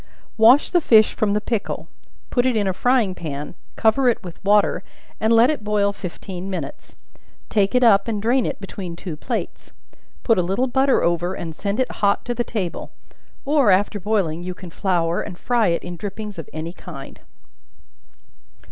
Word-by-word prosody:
Wash 235 Hz, +6 st, +5 dB
the 350 Hz, -, +3 dB
fish 220 Hz, -7 st, +5 dB
from 210 Hz, -2 st, 0 dB
the 210 Hz, -, +2 dB
pickle; 215 Hz, 0 st, -3 dB, 0.4 s
put 245 Hz, 0 st, +2 dB
it 250 Hz, -, +1 dB
in 210 Hz, -2 st, +1 dB
a 190 Hz, -, 0 dB
frying 240 Hz, -1 st, +2 dB
pan; 150 Hz, -4 st, -6 dB, 0.2 s
cover 245 Hz, +4 st, +3 dB
it 230 Hz, -, -1 dB
with 175 Hz, -2 st, -10 dB
water, 205 Hz, +1 st, +3 dB, 0.4 s
and 220 Hz, +1 st, +1 dB
let 230 Hz, +4 st, +6 dB
it 290 Hz, -8 st, -4 dB
boil 205 Hz, -1 st, +1 dB
fifteen 185 Hz, 0 st, -7 dB
minutes; 185 Hz, -, -6 dB, 0.5 s
take 200 Hz, +1 st, +1 dB
it 250 Hz, -, +4 dB
up 200 Hz, -3 st, +5 dB
and 220 Hz, -2 st, -1 dB
drain 240 Hz, +4 st, +2 dB
it -, -, -4 dB
between 190 Hz, -3 st, -7 dB
two 170 Hz, -1 st, -6 dB
plates; 150 Hz, -, -5 dB, 0.5 s
put 225 Hz, -5 st, +3 dB
a -, -, +4 dB
little 195 Hz, +9 st, 0 dB
butter 265 Hz, +1 st, +2 dB
over 175 Hz, +2 st, 0 dB
and 165 Hz, -2 st, -6 dB
send 200 Hz, +7 st, -3 dB
it 260 Hz, -, 0 dB
hot 200 Hz, -1 st, +2 dB
to 245 Hz, -, -1 dB
the 240 Hz, 0 st, -1 dB
table: 195 Hz, -8 st, -4 dB, 0.6 s
or, 280 Hz, -5 st, +3 dB
after 205 Hz, +2 st, +2 dB
boiling, 185 Hz, -5 st, -1 dB
you 180 Hz, 0 st, -5 dB
can 180 Hz, -2 st, -10 dB
flour, 170 Hz, -2 st, 0 dB
and 175 Hz, -, -7 dB
fry 235 Hz, 0 st, +1 dB
it 170 Hz, -1 st, 0 dB
in 175 Hz, -1 st, -7 dB
drippings 205 Hz, 0 st, -6 dB
of 160 Hz, -, -8 dB
any 160 Hz, +2 st, -5 dB
kind. 155 Hz, -7 st, -10 dB
205 Hz, 185 wpm, -22 LUFS, 180-230 Hz, 0.6 s, let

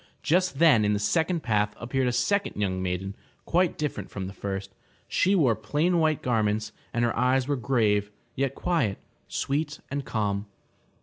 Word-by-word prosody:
just 180 Hz, -1 st, +2 dB
then 145 Hz, -9 st, +6 dB
in 105 Hz, 0 st, +2 dB
the 105 Hz, -, 0 dB
second 165 Hz, -, +1 dB
path 105 Hz, -2 st, +1 dB
appeared 125 Hz, +2 st, 0 dB
a -, -, +2 dB
second 160 Hz, +12 st, 0 dB
young 95 Hz, -2 st, 0 dB
maiden, 95 Hz, +2 st, -3 dB, 0.3 s
quite 175 Hz, 0 st, +2 dB
different 140 Hz, -10 st, -3 dB
from 95 Hz, -2 st, -5 dB
the 95 Hz, -, -6 dB
first. 95 Hz, 0 st, -5 dB, 0.3 s
She 195 Hz, +2 st, +2 dB
wore 135 Hz, -, +4 dB
plain 150 Hz, -, +1 dB
white 155 Hz, -2 st, +1 dB
garments 110 Hz, -3 st, 0 dB, 0.2 s
and 120 Hz, 0 st, +1 dB
her 120 Hz, -, 0 dB
eyes 125 Hz, +1 st, +2 dB
were 145 Hz, -, +1 dB
grave, 110 Hz, -5 st, +1 dB, 0.2 s
yet 135 Hz, 0 st, -1 dB
quiet, 150 Hz, -, 0 dB, 0.3 s
sweet 145 Hz, +1 st, -2 dB
and 140 Hz, 0 st, -2 dB
calm. 105 Hz, -4 st, -2 dB
120 Hz, 170 wpm, -27 LUFS, 105-150 Hz, 0.3 s, then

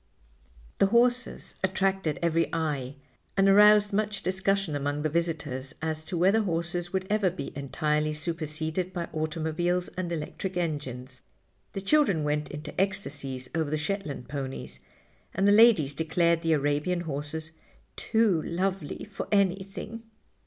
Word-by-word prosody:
The 195 Hz, -, +5 dB
horses 245 Hz, +3 st, +2 dB
attracted 190 Hz, -4 st, 0 dB
every 165 Hz, 0 st, +2 dB
eye 145 Hz, -5 st, -2 dB, 0.4 s
and 195 Hz, 0 st, +5 dB
aroused 210 Hz, +1 st, +6 dB
much 210 Hz, -1 st, -1 dB
discussion 190 Hz, -3 st, 0 dB
among 145 Hz, +1 st, -2 dB
the 155 Hz, -, +1 dB
visitors 150 Hz, -5 st, -2 dB
as 155 Hz, 0 st, -3 dB
to 175 Hz, -, -3 dB
whether 190 Hz, +6 st, +4 dB
horses 175 Hz, -1 st, -2 dB
would 190 Hz, -1 st, -1 dB
ever 210 Hz, -2 st, +2 dB
be 145 Hz, -6 st, -7 dB
entirely 150 Hz, +2 st, 0 dB
superseded 160 Hz, +2 st, -3 dB
by 170 Hz, -2 st, -3 dB
automobiles 160 Hz, +3 st, -1 dB
and 180 Hz, -2 st, -4 dB
electric 175 Hz, +3 st, -4 dB
engines. 130 Hz, -6 st, -4 dB, 0.5 s
The 195 Hz, -, -4 dB
children 200 Hz, -, +3 dB
went 150 Hz, 0 st, -1 dB
into 150 Hz, +1 st, -7 dB
ecstacies 140 Hz, -10 st, -2 dB
over 160 Hz, -3 st, 0 dB
the 155 Hz, -, 0 dB
Shetland 155 Hz, -6 st, -3 dB
ponies, 135 Hz, -1 st, -5 dB, 0.6 s
and 195 Hz, +2 st, +2 dB
the -, -, +6 dB
ladies 205 Hz, -, +6 dB
declared 165 Hz, +2 st, +1 dB
the 165 Hz, -1 st, +2 dB
Arabian 150 Hz, +4 st, +1 dB
horses 155 Hz, 0 st, -4 dB, 0.4 s
"too 220 Hz, -7 st, +2 dB
lovely 185 Hz, -1 st, -2 dB
for 205 Hz, -2 st, -6 dB
anything." 195 Hz, +3 st, 0 dB
170 Hz, 135 wpm, -28 LUFS, 150-195 Hz, 0.6 s, aroused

